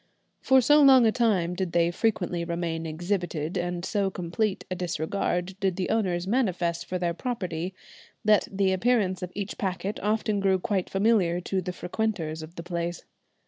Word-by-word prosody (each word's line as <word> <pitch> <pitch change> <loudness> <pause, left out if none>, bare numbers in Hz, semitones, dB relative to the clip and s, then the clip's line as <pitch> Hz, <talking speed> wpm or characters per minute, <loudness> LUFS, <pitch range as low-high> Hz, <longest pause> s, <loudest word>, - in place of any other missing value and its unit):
For 265 0 +5
so 295 +5 +5
long 265 -3 +7
a 220 - +5
time 200 -8 +1
did 180 -1 -3
they 170 0 +3
frequently 175 -4 0
remain 170 -1 -3
exhibited, 175 -1 -2
and 175 -1 -2
so 200 -2 0
complete 190 +3 -2
a - - +2
disregard 180 +1 -2
did 190 -2 0
the 185 -1 -2
owners 185 -6 0
manifest 180 -7 0
for 185 - -2
their 175 -1 -1
property, 185 -5 -4 0.5
that 210 -1 +4
the 195 -1 +1
appearance 190 -2 +1
of 180 -1 -5
each 205 -1 -5
packet 195 +1 -2
often 215 0 0
grew 195 -1 +3
quite 190 0 -1
familiar 195 -4 +2
to 190 +1 -1
the 180 0 -4
frequenters 180 -4 -3
of 155 +2 -10
the 170 - -7
place. 170 -1 -4
185 Hz, 170 wpm, -27 LUFS, 175-210 Hz, 0.5 s, long